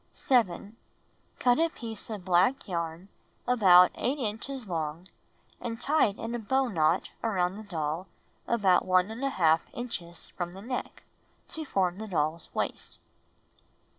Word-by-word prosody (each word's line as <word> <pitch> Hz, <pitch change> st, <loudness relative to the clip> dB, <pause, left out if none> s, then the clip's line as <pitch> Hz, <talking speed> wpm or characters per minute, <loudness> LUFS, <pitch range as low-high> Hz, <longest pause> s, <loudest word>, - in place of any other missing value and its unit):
7. 225 Hz, -3 st, 0 dB, 0.6 s
Cut 245 Hz, +2 st, +3 dB
a 330 Hz, 0 st, +3 dB
piece 230 Hz, -8 st, -7 dB
of 205 Hz, -5 st, -6 dB
black 190 Hz, +10 st, +3 dB
yarn 170 Hz, +1 st, -4 dB, 0.4 s
about 185 Hz, -7 st, +7 dB
8 270 Hz, +4 st, -1 dB
inches 245 Hz, +2 st, -3 dB
long 165 Hz, 0 st, -3 dB, 0.5 s
and 230 Hz, -1 st, -5 dB
tie 295 Hz, +3 st, +3 dB
it 200 Hz, -, -6 dB
in 230 Hz, +1 st, -5 dB
a 240 Hz, -, -2 dB
bow 265 Hz, +4 st, +1 dB
knot 165 Hz, -3 st, +1 dB
around 185 Hz, -4 st, 0 dB
the 215 Hz, -, -7 dB
doll 160 Hz, +1 st, -2 dB, 0.4 s
about 200 Hz, -6 st, +3 dB
1| 185 Hz, -2 st, +2 dB
inches 175 Hz, -9 st, -6 dB
from 175 Hz, -1 st, -5 dB
the 190 Hz, -, -10 dB
neck, 250 Hz, +2 st, -5 dB, 0.5 s
to 320 Hz, -, -4 dB
form 185 Hz, -6 st, 0 dB
the 220 Hz, -, -5 dB
doll's 160 Hz, -3 st, -1 dB
waist. -, -, -3 dB
195 Hz, 135 wpm, -29 LUFS, 175-240 Hz, 0.6 s, about